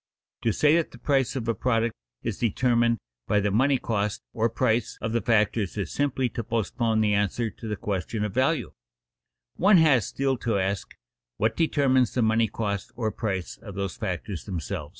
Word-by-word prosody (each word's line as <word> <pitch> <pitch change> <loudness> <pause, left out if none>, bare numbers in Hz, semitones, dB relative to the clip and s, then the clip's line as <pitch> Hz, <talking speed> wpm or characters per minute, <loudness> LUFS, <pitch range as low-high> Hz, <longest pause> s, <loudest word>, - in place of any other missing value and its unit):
To 115 - +2
say 150 +8 +4
that 170 - 0
the - - -13
price 135 -2 +1
of 120 -4 -3
a 115 - +2
product 115 +1 0 0.3
is - - -3
determined 120 0 +2 0.3
by 105 - +3
the 105 0 0
money 135 +6 +3
cost, 105 -4 -2
or 115 +1 +1
price, 115 +1 0
of 115 - -3
the 115 0 +1
factors 110 -3 +1
is 95 -6 -2
simply 135 -3 0
to 115 - -4
postpone 115 0 0
the 105 -1 +2
answer 105 +3 0
to 115 - -9
the 105 - -2
question 105 +2 -3
of 105 - -4
value; 135 +6 +1 0.9
one 195 +1 +6
has 145 - +4
still 135 -1 0
to 115 -3 0
ask, 95 0 -2 0.4
What 110 +2 +1
determines 135 -7 +2
the 125 - +2
money 110 +1 +3
cost, 100 -2 -3
or 110 -3 -1
price, 95 -5 -3
of 100 -4 -10
those 100 -3 -3
factors 95 -5 -4
themselves? 80 -5 -4
115 Hz, 185 wpm, -26 LUFS, 105-125 Hz, 0.9 s, one